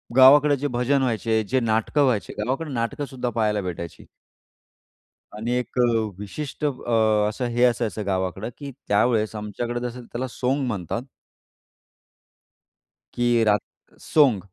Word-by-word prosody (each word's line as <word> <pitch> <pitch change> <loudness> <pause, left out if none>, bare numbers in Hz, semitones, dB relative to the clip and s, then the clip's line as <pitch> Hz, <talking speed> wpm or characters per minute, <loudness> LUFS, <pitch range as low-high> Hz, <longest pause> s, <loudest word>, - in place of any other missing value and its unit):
गावाकडे 145 +3 +7
जे 145 +2 -2
भजन 125 +2 +1
व्हायचे, 115 -3 0
जे 130 +6 0
नाटकं 115 +5 +1
व्हायचे, 120 -6 0
गावाकडे 135 +8 -2
नाटकंसुद्धा 125 +2 -3
पहायला 105 -3 0
भेटायची. 85 -2 -6 1.3
आणि 110 +3 -4
एक 125 +1 -5
अ, - - +6 0.4
विशिष्ट 140 +8 -5
अ, - - +3 0.6
असं 125 +4 -4
हे 120 - +3
असायचं 115 -3 +1
गावाकडं 95 +3 -2
की 140 -1 -7 0.2
त्यावेळेस 110 +1 +2
आमच्याकडे 110 +3 -4
जसं 125 +1 -8
त्याला 130 +3 -4
सोंग 130 +3 -1
म्हणतात. 110 +2 -3 2.1
की 120 -1 +2
रात 105 -1 +3 0.4
सोंग, 135 -9 +4
120 Hz, 125 wpm, -24 LUFS, 105-130 Hz, 2.1 s, गावाकडे